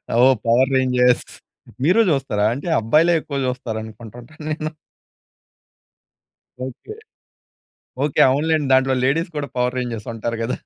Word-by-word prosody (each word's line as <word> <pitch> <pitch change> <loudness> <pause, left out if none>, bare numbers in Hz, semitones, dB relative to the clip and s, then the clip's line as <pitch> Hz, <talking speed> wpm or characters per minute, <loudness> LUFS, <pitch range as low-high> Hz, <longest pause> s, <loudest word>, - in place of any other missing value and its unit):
ఓహ్! 130 +2 +5
Power 125 +3 +4
Rangers 125 -1 +2 0.6
మీరు 180 +10 +4
జూస్తారా? 135 -9 0
అంటే 140 +7 -6
అబ్బాయిలే 155 +10 +3
ఎక్కువ 145 -2 -6
జూస్తారు 125 -3 -3
అనుకుంటుంటా 115 +4 -12 0.2
నేను. 155 0 -3 2.0
ఓకే. 130 - -9 1.1
ఓకే. 145 - 0
అవునులెండి. 150 +1 +1
దాంట్లో 130 0 +3
లేడీస్ 165 +6 0
కూడా 145 -1 -3
పవర్ 125 +1 0
రేంజర్స్ 120 -4 -4
ఉంటారు 115 +1 -3
గదా! 115 +2 -2
130 Hz, 120 wpm, -20 LUFS, 120-145 Hz, 2.0 s, ఓహ్